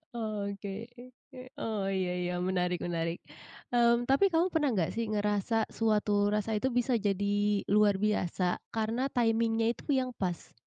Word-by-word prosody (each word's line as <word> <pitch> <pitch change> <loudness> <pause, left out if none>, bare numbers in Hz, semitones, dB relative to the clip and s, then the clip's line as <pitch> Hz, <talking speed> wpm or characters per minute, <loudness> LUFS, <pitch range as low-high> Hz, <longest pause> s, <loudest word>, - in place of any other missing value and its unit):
Oke 200 -3 -4 0.2
ke 245 - -11 0.3
ke. 255 - -10 0.2
Oh, 215 -3 -2
iya 185 -2 -1
iya, 180 0 -2
menarik 180 -1 0
menarik. 165 -1 -2 0.6
Mmm, 235 0 +4
tapi 275 +9 +5
kamu 330 +2 +3
pernah 305 -4 +2
nggak 180 -6 0
sih 230 0 -1
ngerasa 210 +1 0
suatu 210 -2 +1
rasa 210 +1 0
itu 260 +5 0
bisa 245 +1 +1
jadi 205 0 0
luar 205 0 +4
biasa 185 -3 0 0.2
karena 225 +3 -1
timing-nya 225 -1 +2
itu - - -5
yang 260 -2 +1
pas? 180 -5 -4
210 Hz, 150 wpm, -30 LUFS, 195-230 Hz, 0.6 s, tapi